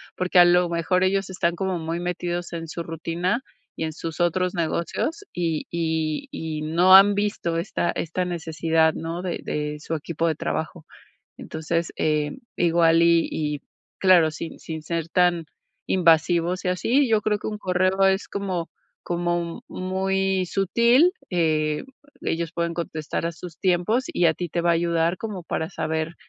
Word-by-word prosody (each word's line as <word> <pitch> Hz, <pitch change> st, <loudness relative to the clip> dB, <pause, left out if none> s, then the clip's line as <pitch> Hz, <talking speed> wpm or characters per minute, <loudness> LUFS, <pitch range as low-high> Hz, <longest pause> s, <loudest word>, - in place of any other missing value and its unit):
Porque, 185 Hz, 0 st, +2 dB
a 175 Hz, -, +9 dB
lo 175 Hz, 0 st, +4 dB
mejor, 170 Hz, +2 st, +1 dB
ellos 195 Hz, 0 st, +1 dB
están 175 Hz, -2 st, 0 dB
como 190 Hz, 0 st, -1 dB
muy 165 Hz, +1 st, -3 dB
metidos 175 Hz, 0 st, -3 dB
en 165 Hz, -1 st, -5 dB
su 170 Hz, -, -5 dB
rutina 170 Hz, -, -2 dB, 0.3 s
y -, -, -4 dB
en 160 Hz, -, -3 dB
sus 165 Hz, 0 st, -6 dB
otros 180 Hz, +1 st, +1 dB
negocios, 170 Hz, -, -2 dB
y 165 Hz, -3 st, -1 dB
y 160 Hz, -, -1 dB
y 160 Hz, -, -4 dB
no 175 Hz, +5 st, +5 dB
han 200 Hz, +1 st, +8 dB
visto 200 Hz, -5 st, -1 dB
esta 175 Hz, 0 st, -1 dB
esta 175 Hz, +3 st, -2 dB
necesidad, 160 Hz, -2 st, +1 dB
¿no?, 165 Hz, +2 st, -4 dB
de 180 Hz, -2 st, -3 dB
de 150 Hz, 0 st, -3 dB
su 160 Hz, -, -5 dB
equipo 165 Hz, +2 st, -2 dB
de 160 Hz, -, +1 dB
trabajo. 160 Hz, +1 st, -4 dB, 0.5 s
Entonces, 165 Hz, +1 st, -3 dB
eh, 150 Hz, -1 st, 0 dB, 0.2 s
igual 165 Hz, -1 st, +4 dB
y 170 Hz, -1 st, +4 dB
y 150 Hz, -2 st, -2 dB, 0.4 s
claro, 180 Hz, -4 st, +5 dB
sin 165 Hz, +1 st, -7 dB
sin 160 Hz, -1 st, -6 dB
ser 165 Hz, +1 st, -3 dB
tan 175 Hz, -2 st, +2 dB, 0.4 s
invasivos 170 Hz, +1 st, +2 dB
y -, -, 0 dB
así, 245 Hz, +9 st, +2 dB
yo 220 Hz, -2 st, +3 dB
creo 210 Hz, 0 st, 0 dB
que -, -, -7 dB
un 210 Hz, -, -5 dB
correo 185 Hz, 0 st, +1 dB
es 195 Hz, +1 st, +1 dB
como 185 Hz, -4 st, -3 dB, 0.3 s
como 175 Hz, -1 st, -2 dB
muy 190 Hz, 0 st, 0 dB
sutil, 235 Hz, -, +3 dB, 0.2 s
eh, 155 Hz, -4 st, +1 dB, 0.4 s
ellos 165 Hz, 0 st, -2 dB
pueden 170 Hz, 0 st, -2 dB
contestar 160 Hz, -1 st, -4 dB
a 170 Hz, -, -2 dB
sus 165 Hz, -1 st, -10 dB
tiempos, 190 Hz, +7 st, +1 dB
y 175 Hz, -, +3 dB
a 160 Hz, -, +3 dB
ti 175 Hz, +1 st, -4 dB
te 170 Hz, -, -1 dB
va 170 Hz, -, +2 dB
a -, -, +5 dB
ayudar 170 Hz, +1 st, +1 dB
como 205 Hz, -3 st, -6 dB
para 160 Hz, -1 st, -3 dB
saber, 160 Hz, +1 st, -2 dB
170 Hz, 165 wpm, -24 LUFS, 165-185 Hz, 0.5 s, a